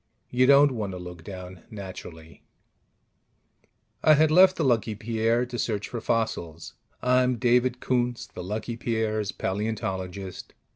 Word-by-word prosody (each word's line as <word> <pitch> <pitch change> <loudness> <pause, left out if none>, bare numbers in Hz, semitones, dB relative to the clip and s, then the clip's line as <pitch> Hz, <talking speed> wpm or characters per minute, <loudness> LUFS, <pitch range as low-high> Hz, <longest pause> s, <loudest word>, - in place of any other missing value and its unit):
You 125 +1 +3
don't 140 +1 +7
want 105 -6 -3
to - - -5
look 90 -2 -9
down, 90 -1 -9
naturally. 90 -5 -10 1.6
I 155 - +7
had 155 +1 +4
left 185 +3 +7
the - - -1
Lucky 115 -4 +1
Pierre 115 +3 0
to 120 -1 -6
search 105 -3 -1
for 120 - -5
fossils 110 -9 -2 0.3
(I'm 125 0 +3
David 125 +1 +2
Koontz, 125 -1 0
the 90 - -9
Lucky 110 +5 -4
Pierre's 110 -3 -1
paleontologist). 95 -2 -4
110 Hz, 135 wpm, -26 LUFS, 95-125 Hz, 1.6 s, don't